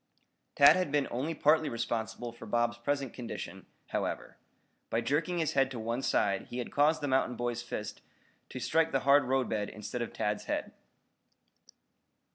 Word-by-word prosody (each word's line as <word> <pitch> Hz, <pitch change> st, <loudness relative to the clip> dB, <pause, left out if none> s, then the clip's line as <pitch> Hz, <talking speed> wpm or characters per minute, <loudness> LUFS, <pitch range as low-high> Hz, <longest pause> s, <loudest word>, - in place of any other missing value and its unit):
Tad 140 Hz, -, +8 dB
had 185 Hz, 0 st, 0 dB
been 145 Hz, -2 st, +2 dB
only 145 Hz, +7 st, -2 dB
partly 155 Hz, +1 st, +3 dB
responsible 115 Hz, 0 st, -3 dB
for 120 Hz, -, -11 dB
Bob's 120 Hz, +1 st, 0 dB
present 140 Hz, 0 st, -1 dB
condition, 120 Hz, -2 st, -7 dB, 0.2 s
however. -, -, -3 dB, 0.5 s
By 115 Hz, -, +1 dB
jerking 150 Hz, +8 st, 0 dB
his 160 Hz, -3 st, +1 dB
head 135 Hz, -1 st, +3 dB
to 125 Hz, -3 st, -6 dB
one 115 Hz, +3 st, -2 dB
side 100 Hz, -6 st, +1 dB
he 120 Hz, -, -6 dB
had 125 Hz, -, -4 dB
caused 150 Hz, +3 st, +3 dB
the 145 Hz, -, -1 dB
mountain 130 Hz, -2 st, +1 dB
boy's 120 Hz, 0 st, -2 dB
fist 105 Hz, -3 st, -6 dB, 0.5 s
to 130 Hz, -, -6 dB
strike 160 Hz, +5 st, +2 dB
the 135 Hz, -, +1 dB
hard 140 Hz, 0 st, +5 dB
roadbed 125 Hz, -5 st, 0 dB
instead 105 Hz, +3 st, -6 dB
of 120 Hz, -, -3 dB
Tad's 105 Hz, 0 st, -2 dB
head. -, -, -2 dB
125 Hz, 165 wpm, -31 LUFS, 115-145 Hz, 0.5 s, Tad